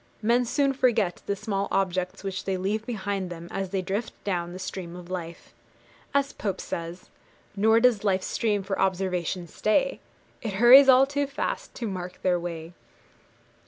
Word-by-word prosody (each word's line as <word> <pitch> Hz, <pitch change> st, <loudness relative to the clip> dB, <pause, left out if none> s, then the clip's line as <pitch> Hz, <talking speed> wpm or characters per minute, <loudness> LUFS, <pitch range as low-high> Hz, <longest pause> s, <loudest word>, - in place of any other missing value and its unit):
Men 240 Hz, +3 st, +3 dB
soon 275 Hz, +3 st, +1 dB
forget 230 Hz, -9 st, +1 dB
the 200 Hz, -, 0 dB
small 200 Hz, -1 st, -2 dB
objects 185 Hz, -1 st, -1 dB
which 195 Hz, 0 st, -4 dB
they 190 Hz, -1 st, -1 dB
leave 210 Hz, +4 st, -2 dB
behind 200 Hz, -5 st, -3 dB
them 170 Hz, -1 st, -8 dB
as 195 Hz, -1 st, -3 dB
they 190 Hz, 0 st, -2 dB
drift 200 Hz, +5 st, -3 dB
down 175 Hz, -3 st, -2 dB
the 180 Hz, -, -7 dB
stream 185 Hz, -2 st, -6 dB
of 180 Hz, 0 st, -10 dB
life. 170 Hz, -2 st, -6 dB, 0.6 s
As 280 Hz, 0 st, +1 dB
Pope 195 Hz, -3 st, -3 dB
says 170 Hz, +2 st, -6 dB, 0.4 s
Nor 220 Hz, +3 st, +4 dB
does 230 Hz, -4 st, +3 dB
life's 190 Hz, -2 st, +1 dB
stream 210 Hz, -3 st, 0 dB
for 195 Hz, 0 st, -3 dB
observation 180 Hz, -2 st, -1 dB
stay; 270 Hz, -, +1 dB, 0.4 s
It 220 Hz, -4 st, -3 dB
hurries 250 Hz, +7 st, +8 dB
all 260 Hz, +1 st, +8 dB
too 285 Hz, +1 st, -1 dB
fast 275 Hz, -, -4 dB
to 235 Hz, -, -4 dB
mark 180 Hz, -2 st, -6 dB
their 180 Hz, -1 st, +2 dB
way. 170 Hz, -1 st, -6 dB
195 Hz, 165 wpm, -26 LUFS, 180-230 Hz, 0.6 s, hurries